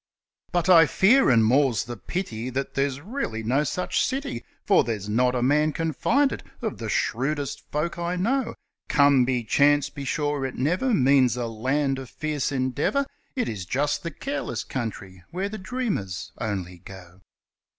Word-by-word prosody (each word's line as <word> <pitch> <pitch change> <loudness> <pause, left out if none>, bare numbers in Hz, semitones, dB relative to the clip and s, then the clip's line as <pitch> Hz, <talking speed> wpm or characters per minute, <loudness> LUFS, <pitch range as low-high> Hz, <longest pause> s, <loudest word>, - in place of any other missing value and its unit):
But 175 0 0
I 165 -4 +7
fear, 235 - +4
and 115 -3 +5
more's 130 -1 +3
the 120 - -6
pity, 120 - -4
that 135 +2 -3
there's 140 0 -1
really 180 - -4
no 130 +6 +2
such 180 +5 -1
city, 260 - -3 0.2
For - - +5
there's 105 -4 -3
not 125 +4 +2
a 120 - 0
man 150 +3 +3
can 165 -1 -2
find 275 - +2
it - - -5 0.2
of 220 -3 -4
the 110 -2 -4
shrewdest 140 +5 -2
folk 170 +4 -2
I 170 +1 -1
know, 235 +8 0 0.3
'Come 140 -3 +5
by 125 -2 -1
chance', 145 +2 +3
be 140 - -7
sure 145 0 -1
it 130 -1 -3
never 180 - 0
means 130 -3 +4
a 120 - -1
land 135 +5 -1
of 130 -3 -8
fierce 150 -3 -2
endeavour, 135 - 0 0.3
It 250 - 0
is 100 -4 -4
just 145 +6 0
the 170 - -4
careless 275 - -4
country 95 -7 -6
where 190 +3 -3
the 215 +1 -6
dreamers 185 - -3
only 95 -5 -4
go. 95 0 -13
140 Hz, 170 wpm, -25 LUFS, 120-170 Hz, 0.3 s, I